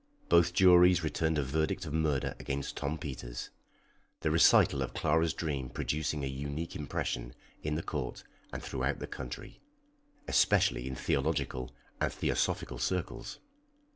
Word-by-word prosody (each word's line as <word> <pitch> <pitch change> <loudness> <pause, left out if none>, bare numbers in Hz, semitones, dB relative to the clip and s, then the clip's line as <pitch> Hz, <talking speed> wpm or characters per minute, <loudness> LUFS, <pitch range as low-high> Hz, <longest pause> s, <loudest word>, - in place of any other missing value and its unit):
Both 85 0 +5
juries 90 -2 +6
returned 80 0 0
a 75 - +1
verdict 80 +7 -1
of 75 - -5
murder 75 -4 +1
against 70 0 -3
Tom 75 +3 -2
Peters, 65 -6 -6 0.7
the 75 - +1
recital 80 0 +5
of - - -3
Clara's 80 +1 +2
dream 70 -6 -3
producing 75 -1 -2
a - - -1
unique 70 +4 -4
impression - - -3 0.3
in 75 0 -2
the 80 - -2
court 70 -5 -4 0.3
and - - -6
throughout - - -1
the - - -5
country, 60 -2 -8 0.7
especially 60 - +3
in 65 - -4
theological 65 0 -1 0.3
and - - +1
theosophical - - -1
circles. 90 -3 -2
75 Hz, 140 wpm, -31 LUFS, 65-80 Hz, 0.7 s, juries